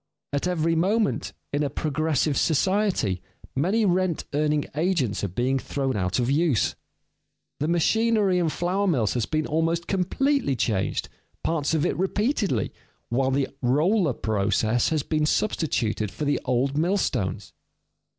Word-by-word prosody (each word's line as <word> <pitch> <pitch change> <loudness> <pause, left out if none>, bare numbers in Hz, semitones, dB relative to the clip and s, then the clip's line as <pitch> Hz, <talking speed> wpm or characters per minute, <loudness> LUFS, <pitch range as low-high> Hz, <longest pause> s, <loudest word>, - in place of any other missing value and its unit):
At 145 +5 0
every 165 -2 +1
moment, 200 +6 +1 0.2
in 145 - +1
a 145 - 0
progressive 155 0 0
society, 175 - +1 0.3
many 190 +11 +2
rent 185 -3 +1
earning 150 0 +1
agents 150 - 0
are - - +1
being 125 +8 0
thrown 135 -1 -2
out 90 -2 0
of 125 +1 +1
use. 145 - +2 0.9
The 150 - 0
machinery 200 +3 +2
in 170 -2 +1
flour 180 +7 0
mills 125 - +1
has 120 -3 -1
been 155 0 0
almost 165 +2 0
completely 200 - +1
changed, 105 -5 -1 0.4
parts 160 -1 0
of 155 +1 +1
it - - 0
repeatedly, 195 - 0 0.4
while 130 +2 +1
the 135 0 0
roller 155 - +2
process 110 +2 +1
has 155 -3 0
been 155 0 0
substituted 120 - 0
for 150 - -5
the 145 - +1
old 130 +2 +1
millstones. 150 - -1
155 Hz, 140 wpm, -25 LUFS, 130-180 Hz, 0.9 s, many